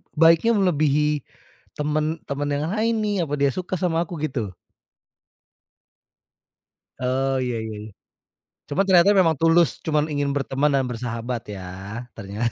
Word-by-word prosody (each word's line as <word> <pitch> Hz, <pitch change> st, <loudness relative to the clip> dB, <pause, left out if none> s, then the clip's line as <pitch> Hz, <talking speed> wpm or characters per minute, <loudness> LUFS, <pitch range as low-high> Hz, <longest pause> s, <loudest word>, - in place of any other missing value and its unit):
baiknya 165 Hz, +8 st, +5 dB
melebihi 150 Hz, -5 st, +2 dB, 0.6 s
teman 155 Hz, +2 st, 0 dB
teman 145 Hz, +1 st, -3 dB
yang 145 Hz, +1 st, -1 dB
lain 225 Hz, +2 st, +1 dB
nih 205 Hz, -1 st, 0 dB
apa 145 Hz, -, -5 dB
dia 140 Hz, -1 st, +2 dB
suka 185 Hz, 0 st, -3 dB
sama 170 Hz, -2 st, 0 dB
aku 175 Hz, -, -6 dB
gitu? 115 Hz, -10 st, -3 dB, 2.5 s
Oh 130 Hz, +2 st, 0 dB
iya 125 Hz, -1 st, -2 dB
iya 110 Hz, -, -6 dB
iya. 110 Hz, -, -9 dB, 0.8 s
Cuma 175 Hz, +7 st, +1 dB
ternyata 185 Hz, +1 st, +6 dB
memang 165 Hz, -3 st, +4 dB
tulus, 165 Hz, 0 st, +5 dB, 0.2 s
cuma 155 Hz, -2 st, +2 dB
ingin 145 Hz, -1 st, 0 dB
berteman 140 Hz, +1 st, +1 dB
dan 135 Hz, -, +2 dB
bersahabat 115 Hz, 0 st, -4 dB
ya, 95 Hz, -, -8 dB, 0.6 s
ternyata. 110 Hz, +3 st, -3 dB
150 Hz, 135 wpm, -23 LUFS, 130-165 Hz, 2.5 s, ternyata